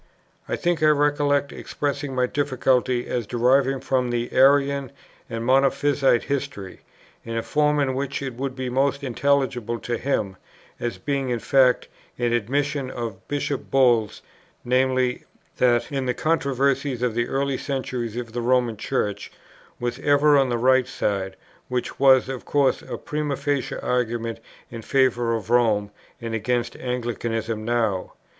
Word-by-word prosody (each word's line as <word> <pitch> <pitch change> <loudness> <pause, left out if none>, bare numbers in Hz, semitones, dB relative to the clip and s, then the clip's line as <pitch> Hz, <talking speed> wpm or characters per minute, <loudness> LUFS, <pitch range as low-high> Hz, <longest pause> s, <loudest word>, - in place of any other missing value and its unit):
I - - 0
think 175 -2 0
I 155 - +5
recollect 145 -1 +2
expressing 140 -1 -3
my 125 0 +2
difficulty, 130 -2 +1
as 120 -4 -3
derived 130 +2 +2
from 130 -2 0
the 120 0 -2
Arian 140 0 +3 0.4
and 115 0 -4
Monophysite 135 0 +3
history, 140 -9 -4 0.4
in 115 0 -4
a 115 - -1
form 150 0 +1
in 135 -2 +1
which 140 +1 -3
it 135 -2 -4
would 130 +2 -4
be 130 -1 -4
most 140 +3 0
intelligible 130 -3 0
to 120 -1 -3
him, 105 -8 -1 0.4
as 120 - -3
being 140 -2 -2
in 120 - 0
fact 130 +1 +3 0.3
an 120 -1 0
admission 140 +4 -1
of 115 -6 -6
Bishop 145 -1 -3
Bull's; 120 -5 +2 0.4
viz. 130 0 +1 0.4
that 120 +3 +2
in 135 -2 -2
the 125 - 0
controversies 140 -4 0
of 125 -2 +1
the 120 +1 0
early 135 -1 -1
centuries 125 -5 -3
the 120 0 -4
Roman 120 -2 +1
Church 105 0 -2 0.5
was 120 +1 -3
ever 145 +1 +4
on 135 -2 +3
the 120 - 0
right 130 +1 +3
side, 95 -5 -2 0.3
which 125 -1 -3
was 130 -2 +6
of 130 -2 -5
course 140 -2 +1
a - - -6
primâ 150 -2 -3
facie 140 -3 -1
argument 115 -2 -2 0.3
in 115 -1 -7
favour 120 -2 +1
of 110 0 -5
Rome 110 -4 +2 0.3
and 115 -1 -5
against 120 +2 -1
Anglicanism 115 -3 -3
now. 110 -5 -1
130 Hz, 150 wpm, -23 LUFS, 120-140 Hz, 0.5 s, was